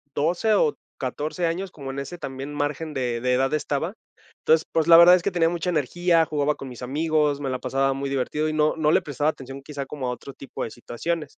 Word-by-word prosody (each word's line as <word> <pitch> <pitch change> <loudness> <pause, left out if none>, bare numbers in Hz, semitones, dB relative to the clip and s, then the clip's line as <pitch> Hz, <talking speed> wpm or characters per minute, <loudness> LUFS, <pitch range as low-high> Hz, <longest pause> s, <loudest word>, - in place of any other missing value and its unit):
12, 175 +8 +2
o 155 -6 +2 0.2
14, 150 +7 -3
años, 180 +4 -2
como 140 -5 -7
en 140 - -5
ese 140 +6 -6
también 135 -2 -6
margen 150 +2 -3
de 120 -3 -1
de 125 +1 +1
edad 135 +3 +1
estaba. 155 +4 -1 0.5
Entonces, 160 0 +3
pues, 160 0 +1
la 165 - +9
verdad 170 +1 +9
es 180 - +5
que 190 - 0
tenía 165 -2 +2
mucha 175 0 -2
energía, 170 +2 +2
jugaba 150 -1 0
con 135 - -8
mis 125 -1 -10
amigos, 150 +2 +1
me 135 -2 -2
la 130 - -2
pasaba 135 +1 0
muy 140 +1 -3
divertido 145 +3 -1
y - - -2
no 155 0 +2
no 155 -1 +2
le - - +3
prestaba 145 +1 0
atención, 135 -2 -7
quizá 140 -1 -6
como 135 -2 -5
a 125 - 0
otro 130 +3 -8
tipo 135 - -7
de 115 - -5
situaciones. 150 +7 -4
150 Hz, 230 wpm, -24 LUFS, 135-165 Hz, 0.5 s, la